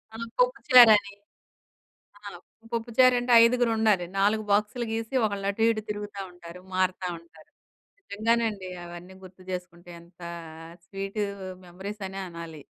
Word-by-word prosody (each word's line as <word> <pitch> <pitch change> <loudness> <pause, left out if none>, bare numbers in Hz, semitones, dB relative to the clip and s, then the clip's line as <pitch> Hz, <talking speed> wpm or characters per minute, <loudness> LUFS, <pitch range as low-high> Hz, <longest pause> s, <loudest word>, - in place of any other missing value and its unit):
ఆ! - - -7 0.2
పోప్పు - - +2
చారని. 220 -5 +8 1.0
ఆ! - - -23 0.5
పోప్పుచారంటే 245 +2 +2
ఐదుగురుండాలి. 225 -6 +2
4 215 +2 +2
బాక్సులు 215 +4 +1
గీసి 225 +3 -4
ఒకళ్ళు 200 -2 -3
అటు, 210 - -6
ఇటు 215 -1 -3
తిరుగుతా 205 -1 -5
ఉంటారు. 175 0 -12
మారతా 185 0 0
ఉంటారు. 165 -2 -20 0.5
నిజంగానండి. 220 - -1 0.2
అవన్నీ 175 +2 -10
గుర్తు 185 0 -14
చేసుకుంటే 175 -1 -7
ఎంత 175 +1 -21 0.6
స్వీటు 195 +2 -4 0.4
మెమోరీస్ 195 +4 -8
అనె 190 +1 -7
అనాలి. 165 -3 -9
200 Hz, 120 wpm, -26 LUFS, 180-225 Hz, 1.0 s, చారని